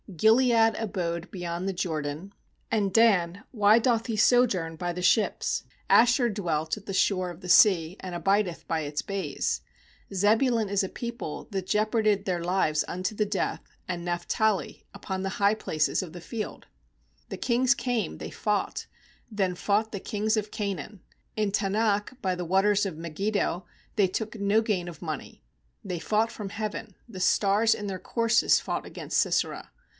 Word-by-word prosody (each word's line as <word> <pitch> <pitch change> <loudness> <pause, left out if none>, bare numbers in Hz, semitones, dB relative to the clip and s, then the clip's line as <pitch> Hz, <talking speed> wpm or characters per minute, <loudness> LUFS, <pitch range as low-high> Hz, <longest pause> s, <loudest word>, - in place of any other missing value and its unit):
17Gilead 225 +4 +4
abode 175 -4 -3
beyond 175 0 -3
the - - -2
Jordan; 160 +1 -3 0.4
And 205 -4 +1
Dan, 200 -4 +3
why 215 -1 +5
doth 230 -1 +1
he 225 -2 -2
sojourn 205 -9 +3
by 175 +2 -3
the 180 +1 -5
ships? 210 +3 +2 0.3
Asher 245 +1 +5
dwelt 165 -7 -1
at 210 -2 -12
the 195 - -4
shore 185 -1 +1
of 175 -1 -9
the 180 - -8
sea, 180 -3 +5
And 185 -1 -6
abideth 195 0 0
by 165 -1 0
its 145 0 -3
bays. 195 -1 -2 0.5
18Zebulun 220 +3 +2
is 200 0 +1
a 190 - -3
people 235 -10 -6
that 190 -2 -3
jeoparded 215 -1 +1
their 175 -3 -1
lives 170 -4 +1
unto 185 +4 -2
the 210 0 0
death, 200 -1 -2 0.3
And 175 -2 -3
Naphtali, 180 +4 -1
upon 190 -1 -5
the 195 - -2
high 200 +1 +4
places 155 -7 0
of 175 - -8
the 175 - -8
field. 215 +4 -6 0.6
19The - - -7
kings 255 +2 +3
came, 235 -7 -2
they - - -7
fought; 210 -2 -2 0.4
Then 190 -4 0
fought 210 +4 0
the 200 - -3
kings 215 +3 -1
of 215 -1 -2
Canaan, 200 -1 -4 0.4
In 210 -2 +1
Taanach 210 +4 0
by 185 -5 0
the 180 - -4
waters 195 +4 +2
of 180 - -6
Megid 170 +6 -3
do; 185 -3 0 0.3
They 205 -4 +4
took 220 +4 -4
no 200 +2 +2
gain 200 -6 -1
of 170 - -11
money. - - -6 0.4
20They 180 -4 -4
fought 220 +4 +1
from 205 -3 -6
heaven, 215 0 -5
The 205 -6 -9
stars 205 +4 +3
in 210 -2 -5
their 190 -2 -4
courses 230 +2 +2
fought - - -3
against - - -4
Sisera. - - 0
200 Hz, 170 wpm, -27 LUFS, 180-220 Hz, 0.6 s, why